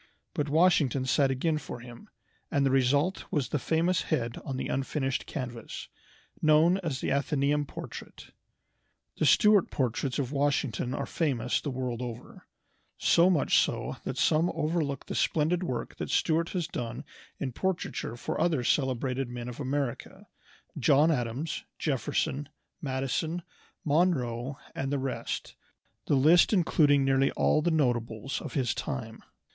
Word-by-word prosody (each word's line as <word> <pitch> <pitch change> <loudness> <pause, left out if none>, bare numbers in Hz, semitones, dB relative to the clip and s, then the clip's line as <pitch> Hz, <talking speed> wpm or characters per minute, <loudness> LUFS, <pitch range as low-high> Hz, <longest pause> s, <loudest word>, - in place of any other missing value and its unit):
But 145 -1 -1
Washington 150 -5 +3
sat 135 +1 +3
again 150 +4 0
for 140 -4 -7
him, 120 0 -12 0.4
and 140 -1 +2
the 135 - +2
result 140 +7 +2
was 145 -5 -1
the 150 - 0
famous 170 +6 +1
head 120 -7 -2
on 135 -2 -4
the - - -3
unfinished 135 0 -2
canvas, 125 -6 -6 0.5
now 155 0 +5
known 170 +4 +4
as 155 -8 -3
the - - -1
"Athenæum" 140 +1 +1
portrait. - - -9 0.9
The - - +2
Stuart 210 -4 +5
portraits 130 0 -1
of 135 -2 -2
Washington 140 -3 0
are - - -2
famous 125 -7 0
the 145 - -3
world 125 -2 -3
over; 120 -1 -8 0.5
so 170 +2 +4
much 165 -7 +4
so - - -1
that 130 - -4
some 160 +5 +3
overlook 155 -3 -1
the - - -5
splendid 165 +3 +1
work 130 -10 -4
that - - -4
Stuart 165 +1 +1
has 180 -3 -2
done 120 -5 -5 0.3
in 135 -3 -3
portraiture 170 -6 -3
for 160 +6 -3
other 155 -7 +2
celebrated 130 -1 0
men 120 0 -6
of 125 +1 -7
America 140 -2 -3 0.5
John 145 +4 +5
Adams, 125 +3 -2
Jefferson, 140 +1 -1 0.3
Madison, 145 +5 -2 0.4
Monroe, 140 -6 +1 0.2
and 135 0 -3
the 145 - +1
rest, 135 -1 -4 0.5
the - - +3
list 155 +6 +6
including 150 -7 +4
nearly 135 0 +3
all 155 - +2
the 170 - +1
notables 120 -5 0
of - - -7
his 130 -5 +1
time. 115 -7 -5
140 Hz, 145 wpm, -29 LUFS, 125-155 Hz, 0.9 s, list